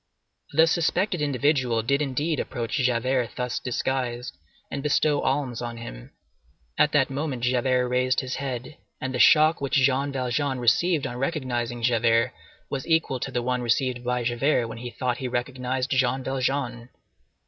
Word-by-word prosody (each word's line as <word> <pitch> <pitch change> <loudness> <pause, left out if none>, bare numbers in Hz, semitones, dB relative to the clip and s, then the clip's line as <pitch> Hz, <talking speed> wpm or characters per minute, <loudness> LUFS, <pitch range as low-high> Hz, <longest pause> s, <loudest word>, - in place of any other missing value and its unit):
"The 160 +3 +5
suspected 175 +2 +1
individual" 130 -5 +1
did 140 +5 +1
indeed 145 +3 -1
approach 120 -3 -4
Javert 125 -1 0
thus 125 -1 -2
disguised, 125 - -2 0.4
and 140 - -3
bestow 150 0 +2
alms 130 -4 -1
on 120 -1 -5
him. - - -9 0.6
At 150 - +3
that 135 -2 +3
moment 135 -3 -3
Javert 125 0 +2
raised 125 +1 +1
his 130 0 -4
head, 130 +1 -5 0.2
and 130 0 -3
the 125 - -2
shock 155 +3 +6
which 140 +2 -1
Jean 140 +1 +2
Valjean 130 +1 -1
received 150 +6 +2
on 120 - -4
recognizing 125 -5 -2
Javert 115 0 +3 0.3
was 135 +1 -4
equal 160 -5 +1
to 135 - -3
the 125 -2 -2
one 125 0 0
received 125 +1 0
by 125 0 -1
Javert 120 +2 +1
when 115 0 -8
he 120 +1 -5
thought 120 +1 -2
he 130 - -3
recognized 125 +1 -2
Jean 130 0 +1
Valjean. 130 -2 -2
130 Hz, 160 wpm, -25 LUFS, 120-140 Hz, 0.6 s, shock